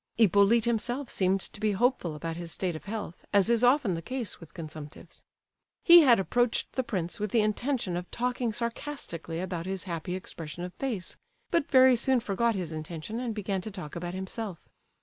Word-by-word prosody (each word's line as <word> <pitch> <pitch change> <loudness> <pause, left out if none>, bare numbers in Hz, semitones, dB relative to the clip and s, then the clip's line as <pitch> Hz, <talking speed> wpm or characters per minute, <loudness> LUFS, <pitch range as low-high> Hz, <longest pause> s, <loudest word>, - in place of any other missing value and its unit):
Hippolyte 215 +1 +5
himself 240 +3 -1
seemed 190 0 +1
to 205 - -6
be 215 -1 +1
hopeful 200 -7 +1
about 165 +2 -4
his 170 -1 -6
state 180 -1 -2
of 155 - -9
health, 210 -4 -6
as 205 +2 +4
is 235 0 +3
often 245 -5 +4
the 165 - -3
case 250 +4 -4
with 165 -3 -13
consumptives. 155 -3 -9 0.6
He 345 0 +10
had 250 -7 +6
approached 240 +4 +1
the 260 - +1
prince 185 -8 -3
with 210 0 -1
the 225 +2 +3
intention 215 -2 -1
of 175 +1 -4
talking 245 -1 -1
sarcastically 230 - -4
about 180 -1 -4
his 190 -1 -2
happy 175 -1 -4
expression 170 -3 -6
of 180 0 -6
face, 225 -9 -3 0.3
but 335 -4 +1
very 260 -1 +7
soon 255 +2 +3
forgot 230 +1 0
his 180 -4 -3
intention 160 +7 -5
and 240 -3 -3
began 195 -2 -2
to 215 - -6
talk 180 -7 -8
about 175 +1 -4
himself. 190 0 -5
200 Hz, 190 wpm, -29 LUFS, 175-235 Hz, 0.6 s, He